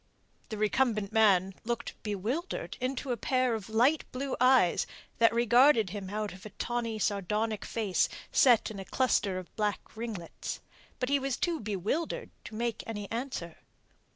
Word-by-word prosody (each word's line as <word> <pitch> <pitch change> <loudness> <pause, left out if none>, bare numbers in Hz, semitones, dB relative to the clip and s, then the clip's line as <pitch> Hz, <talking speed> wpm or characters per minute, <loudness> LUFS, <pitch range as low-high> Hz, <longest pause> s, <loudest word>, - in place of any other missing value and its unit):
The 215 - -4
recumbent 215 -1 +1
man 195 -4 +4
looked 235 0 -3
up - - -28
bewildered 220 - -3
into 260 +1 -2
a 240 - 0
pair 255 +2 +1
of 220 -2 -4
light 250 +8 +3
blue 270 +1 -3
eyes 255 -9 +5 0.3
that 230 -1 +6
regarded 235 -2 +5
him 200 -2 -5
out 210 0 -3
of 190 - -13
a 215 - -7
tawny, 230 0 -3
sardonic 210 +1 -1
face 210 -5 0 0.2
set 240 -4 +5
in 205 - -7
a 195 - -6
cluster 205 -7 +1
of 185 -1 -9
black 210 0 -2
ringlets. 220 -7 -5 0.4
But 255 - -1
he 280 0 +3
was 270 -2 -2
too 340 -3 0
bewildered 210 - -2
to 215 - -8
make 235 0 -2
any 210 -3 -5
answer. 230 -9 -4
225 Hz, 160 wpm, -30 LUFS, 205-255 Hz, 0.4 s, that